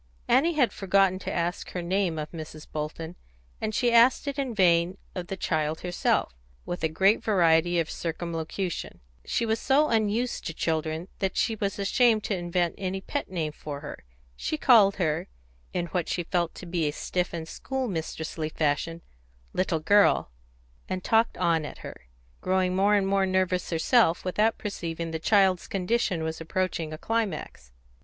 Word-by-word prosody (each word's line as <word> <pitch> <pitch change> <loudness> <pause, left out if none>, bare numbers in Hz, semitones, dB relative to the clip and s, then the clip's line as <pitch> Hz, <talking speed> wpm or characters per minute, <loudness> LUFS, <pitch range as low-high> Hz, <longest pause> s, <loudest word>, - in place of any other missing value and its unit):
Annie 330 +5 +4
had 265 -6 +3
forgotten 195 -1 +2
to - - -5
ask 175 +1 -2
her 180 - -2
name 180 -2 0
of 150 0 -5
Mrs. 155 -2 -8
Bolton, 160 +2 -5 0.5
and 215 -1 -2
she 245 -2 +2
asked 235 +4 +5
it 280 0 -2
in 260 -4 -2
vain 175 -1 +3 0.2
of 180 -2 -5
the 195 - -5
child 155 -2 -1
herself, 175 - 0 0.3
with 175 -1 -5
a 160 - +2
great 195 +8 +3
variety 175 -4 +3
of 165 - 0
circumlocution; 170 - -4 0.2
she 235 - 0
was 220 0 0
so 290 +3 +3
unused 225 +2 0
to 165 - -5
children 160 +1 -1
that 195 -3 -1
she 225 - +1
was 200 -2 -2
ashamed 215 +2 +3
to 205 - -1
invent 175 -1 0
any 190 0 -2
pet - - -4
name 165 -5 -2
for 145 -1 -7
her; 150 - -8 0.3
she 310 - -2
called 220 -9 +6
her, 160 -5 -1 0.4
in 175 -1 -1
what 175 -1 -2
she 175 - -1
felt 170 -1 -1
to - - -9
be 170 -3 -1
a - - 0
stiff 180 +3 -2
and 165 -2 -5
school 265 +8 -3
mistressly 160 -3 -4
fashion, 160 +2 -1 0.5
"Little 180 -3 0
Girl," 200 - +4 0.6
and 185 -1 -3
talked 225 +1 +2
on 165 -2 +2
at 150 - -7
her, - - -10 0.3
growing 185 0 +1
more 200 +2 +4
and 200 -1 +2
more 195 0 +2
nervous 185 -1 0
herself 170 +2 +3
without 210 +5 +1
perceiving 170 -5 -4
that 160 0 -4
the - - -2
child's 190 -4 +4
condition 190 -3 0
was 160 0 -4
approaching 170 -1 -2
a 155 - -5
climax. 185 - -3
180 Hz, 175 wpm, -27 LUFS, 165-200 Hz, 0.6 s, called